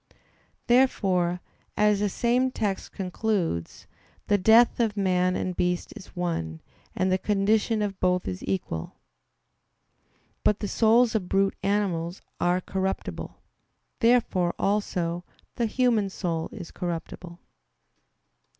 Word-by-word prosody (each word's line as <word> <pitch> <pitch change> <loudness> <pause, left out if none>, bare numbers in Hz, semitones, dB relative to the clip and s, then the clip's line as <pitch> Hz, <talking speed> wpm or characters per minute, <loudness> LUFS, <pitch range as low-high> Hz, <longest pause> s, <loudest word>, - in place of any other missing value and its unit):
Therefore, 190 -8 +2 0.4
as 210 -1 +3
the 205 0 +1
same 245 +5 +1
text 205 -6 -3
concludes, 185 - -2 0.4
"the 205 - +5
death 225 +6 +5
of 220 -3 +1
man 185 -2 +2
and 185 -1 -2
beast 180 0 -1
is 190 - -12
one, 85 - -3 0.4
and 185 +1 +1
the 185 - +2
condition 210 +2 +1
of 200 -2 -4
both 180 0 +1
is 90 0 -4
equal." 90 -4 -3 1.5
But 210 - +3
the 205 - -3
souls 225 +3 +4
of 200 -5 -2
brute 195 0 +2
animals 190 -4 -1 0.2
are 180 +1 +2
corruptible. 190 +1 -4 0.6
Therefore, 230 -7 +2
also, 180 -4 -1 0.3
the 235 - 0
human 230 -4 +2
soul 170 -4 -3
is 170 - -9
corruptible. 170 0 -5
195 Hz, 115 wpm, -26 LUFS, 175-215 Hz, 1.5 s, the